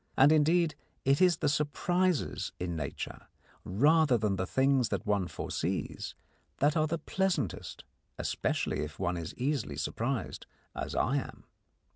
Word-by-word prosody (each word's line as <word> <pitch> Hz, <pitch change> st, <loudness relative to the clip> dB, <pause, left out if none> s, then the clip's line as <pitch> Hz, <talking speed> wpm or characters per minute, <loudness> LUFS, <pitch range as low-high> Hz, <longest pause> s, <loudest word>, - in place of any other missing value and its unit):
And, 135 Hz, +3 st, +7 dB
indeed, 160 Hz, +1 st, +4 dB, 0.3 s
it 135 Hz, +5 st, +3 dB
is 180 Hz, -2 st, +5 dB
the -, -, 0 dB
surprises 165 Hz, +4 st, 0 dB
in 90 Hz, -1 st, -2 dB
nature, 80 Hz, -3 st, -5 dB, 0.4 s
rather 145 Hz, -, +4 dB
than 105 Hz, -3 st, 0 dB
the 95 Hz, 0 st, -2 dB
things 130 Hz, -1 st, +2 dB
that -, -, -2 dB
one 100 Hz, -3 st, +1 dB
foresees, -, -, -3 dB, 0.4 s
that 145 Hz, +2 st, +3 dB
are 155 Hz, -1 st, +3 dB
the 165 Hz, +2 st, -1 dB
pleasantest 190 Hz, +4 st, -2 dB, 0.3 s
especially -, -, -1 dB
if 75 Hz, -1 st, -4 dB
one 90 Hz, -1 st, -1 dB
is 85 Hz, -1 st, -5 dB
easily 125 Hz, -, -1 dB
surprised, 115 Hz, -, -3 dB, 0.3 s
as -, -, -4 dB
I -, -, +2 dB
am. -, -, -5 dB
140 Hz, 140 wpm, -31 LUFS, 100-155 Hz, 0.4 s, And